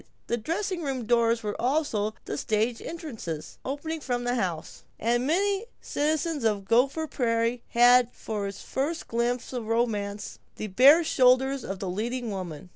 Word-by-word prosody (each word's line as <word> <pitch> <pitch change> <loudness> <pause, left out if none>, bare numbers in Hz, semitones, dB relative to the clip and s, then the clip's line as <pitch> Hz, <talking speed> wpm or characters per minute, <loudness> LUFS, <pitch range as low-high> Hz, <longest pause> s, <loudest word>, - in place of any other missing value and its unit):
The 235 - 0
dressing 345 - -2
room 265 -6 -3
doors 230 0 +2
were 210 -1 -2
also 240 -6 0
the - - -4
stage 220 +2 0
entrances, 235 - -6
opening 305 +4 -4
from 245 -3 -2
the 245 0 0
house, 180 -9 -3 0.2
and 240 +3 +1
many 390 +5 +2
a 440 - -10
citizen 305 -1 -1
of 210 -3 +1
Gopher 265 +9 +2
Prairie 235 -3 0
had 245 0 +5
for 210 -2 -4
his 195 - -8
first 305 +5 -2
glimpse 240 +2 -1
of 240 -3 -4
romance 210 -3 -1 0.2
the - - -5
bare 265 - +6
shoulders 265 -1 +3
of 195 - -4
the 190 - -5
leading 230 +5 -3
woman. 180 -4 -6
240 Hz, 160 wpm, -27 LUFS, 215-275 Hz, 0.2 s, bare